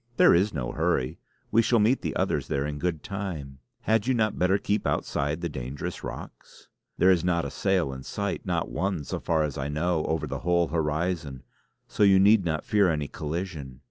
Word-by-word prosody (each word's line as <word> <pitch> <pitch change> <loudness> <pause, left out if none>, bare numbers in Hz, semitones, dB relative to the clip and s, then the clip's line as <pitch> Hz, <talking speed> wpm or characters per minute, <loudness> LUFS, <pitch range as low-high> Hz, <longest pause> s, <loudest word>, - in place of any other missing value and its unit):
There - - +7
is 95 +5 +3
no 65 -6 -3
hurry; 80 -5 0 0.3
we 115 - +5
shall 115 +2 +2
meet 115 +5 +3
the - - -3
others - - 0
there 70 0 -1
in 75 0 -4
good 85 -3 -2
time. 85 -10 -5 0.2
Had 110 +1 +1
you 130 - +2
not 110 -2 0
better 90 +2 +3
keep 100 +1 -1
outside 75 +4 -1
the 85 - -1
dangerous 65 -2 -6
rocks. - - -9 0.3
There 95 - +5
is 90 -2 +2
not 85 -2 +1
a - - -5
sail 95 -8 0
in 65 - -7
sight; - - -3
not - - -2
one, 90 -2 -1
so - - -4
far 80 -2 +1
as 75 -2 -3
I 70 - -2
know, 80 +2 0
over 80 -1 -1
the 70 -1 -4
whole 85 +1 +1
horizon, 80 -3 -2 0.4
so - - -5
you 100 -2 +7
need 100 +1 +5
not 80 -3 -2
fear 105 -4 +3
any 75 -3 -1
collision. 75 -5 -5
85 Hz, 205 wpm, -27 LUFS, 75-95 Hz, 0.4 s, There